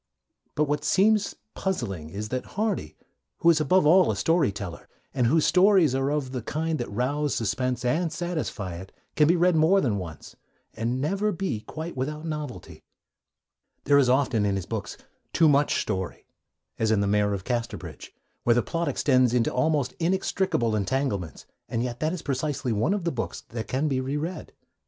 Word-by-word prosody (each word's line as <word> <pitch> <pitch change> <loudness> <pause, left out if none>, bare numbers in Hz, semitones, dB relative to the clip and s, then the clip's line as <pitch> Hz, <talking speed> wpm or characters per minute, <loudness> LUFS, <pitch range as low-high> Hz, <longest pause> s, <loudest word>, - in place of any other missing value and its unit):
But 150 - +2
what 150 0 -1
seems 210 +1 +3 0.2
puzzling 95 - -3
is 105 +5 -5
that 130 - -5
Hardy, 215 0 -1 0.4
who 170 - +5
is 160 -2 +2
above 180 +1 +3
all 180 +4 +6
a - - 0
story 165 - +2
teller, 100 -4 -7 0.3
and 125 -3 +2
whose 155 +5 +3
stories 185 -6 +5
are 135 +1 0
of 145 -3 -1
the 130 -2 -3
kind 155 +6 -2
that 120 - -3
rouse 140 +6 -1
suspense 125 +3 -1
and 160 +6 +1
satisfy 155 - -4
it, 95 +2 -10 0.2
can 150 -1 +4
be 170 - +4
read 175 0 +3
more 160 +5 +4
than 110 - 0
once, 85 -4 -9 0.4
and 120 +3 -2
never 195 +9 0
be 190 - -2
quite 160 +8 -7
without 150 +4 -3
novelty. 150 -5 -6 1.0
There 140 0 +5
is 130 -3 +3
often, 130 -4 +2
in 100 -1 +1
his 95 - -3
books, - - -5 0.4
too 165 - +5
much 145 0 +3
story, 95 -3 -3 0.5
as 110 - +1
in 110 -2 +3
The - - +1
Mayor 105 0 +2
of 95 - -6
Casterbridge, 120 0 -4 0.3
where 120 - +4
the 120 - +2
plot 170 0 -2
extends 130 -3 +2
into 115 -2 +1
almost 140 0 +1
inextricable 175 - 0
entanglements; 100 - -2 0.2
and 115 - -1
yet 120 -1 -4
that 155 +2 0
is 180 -2 -5
precisely 135 -2 -2
one 115 - +1
of 200 - -3
the 170 - 0
books 115 - -4
that 115 -1 -5
can 135 +4 0
be 130 -3 0
re 135 +3 -2
read. 165 +3 -5
140 Hz, 185 wpm, -26 LUFS, 115-165 Hz, 1.0 s, all